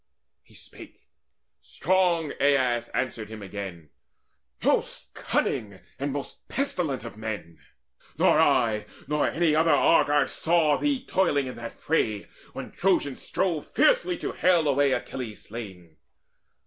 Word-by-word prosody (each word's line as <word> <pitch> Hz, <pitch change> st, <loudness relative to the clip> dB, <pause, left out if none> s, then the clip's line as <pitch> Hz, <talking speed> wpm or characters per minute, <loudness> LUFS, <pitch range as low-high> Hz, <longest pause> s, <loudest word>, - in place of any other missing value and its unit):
He -, -, -22 dB
spake; -, -, -14 dB, 0.5 s
strong 175 Hz, -3 st, +1 dB
Aias 130 Hz, -4 st, +2 dB
answered 115 Hz, -4 st, -3 dB
him 110 Hz, -2 st, -8 dB
again. 95 Hz, -5 st, -7 dB, 0.7 s
"Most -, -, 0 dB
cunning 100 Hz, -3 st, -2 dB, 0.2 s
and 140 Hz, +1 st, -2 dB
most 140 Hz, 0 st, -7 dB
pestilent 175 Hz, -, -2 dB
of 115 Hz, -3 st, -9 dB
men, 105 Hz, -7 st, -6 dB, 0.6 s
Nor -, -, +4 dB
I, 110 Hz, -3 st, +2 dB, 0.2 s
nor 150 Hz, 0 st, +1 dB
any 165 Hz, -2 st, +1 dB
other 160 Hz, +1 st, +3 dB
Argive, 145 Hz, -3 st, +4 dB
saw 160 Hz, -3 st, +2 dB
Thee 275 Hz, -3 st, 0 dB
toiling 170 Hz, -7 st, +1 dB
in 130 Hz, -, -6 dB
that 115 Hz, 0 st, -7 dB
fray, 110 Hz, -10 st, -1 dB, 0.3 s
when -, -, -7 dB
Trojans 175 Hz, -7 st, 0 dB
strove 170 Hz, -5 st, -1 dB
Fiercely -, -, +2 dB
to -, -, -4 dB
hale 175 Hz, -4 st, +2 dB
away 140 Hz, 0 st, +3 dB
Achilles 125 Hz, -4 st, -4 dB
slain. 95 Hz, -8 st, -9 dB
140 Hz, 125 wpm, -26 LUFS, 110-165 Hz, 0.7 s, Nor